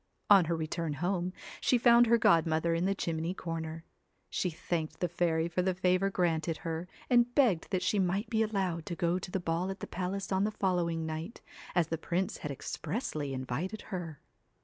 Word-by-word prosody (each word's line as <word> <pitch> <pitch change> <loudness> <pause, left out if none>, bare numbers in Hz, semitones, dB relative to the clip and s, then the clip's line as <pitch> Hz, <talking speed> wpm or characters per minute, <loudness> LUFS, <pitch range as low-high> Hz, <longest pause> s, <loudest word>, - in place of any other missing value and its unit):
On 195 -4 +8
her 170 +1 0
return 160 0 -2
home 180 +3 -1 0.3
she 250 - +4
found 240 0 +6
her 235 +1 +5
godmother 165 -4 +3
in 165 +2 +1
the 195 +1 +1
chimney 165 0 -2
corner. 165 -2 -5 0.5
She 180 - 0
thanked 160 -1 -3
the 180 - +1
fairy 165 -1 +1
for 175 +1 0
the 185 0 0
favour 185 +1 +2
granted 165 -3 0
her, 165 +1 -3 0.2
and 245 -1 +3
begged 230 - +3
that 185 -2 0
she 205 - +2
might 190 +4 +1
be 220 -1 +1
allowed 190 -7 -1
to 170 - -3
go 175 0 +1
to 180 - -7
the 190 - -1
ball 175 +2 -1
at 195 - -5
the - - -5
palace 190 +2 -4
on 190 +1 +2
the 210 - +2
following 175 -5 0
night, 160 +6 -5 0.3
as 175 -2 +4
the 165 - -2
prince 180 +3 -1
had 150 - -5
expressly 150 - -3
invited 135 - -3
her. 165 -5 -4
175 Hz, 195 wpm, -31 LUFS, 165-195 Hz, 0.5 s, On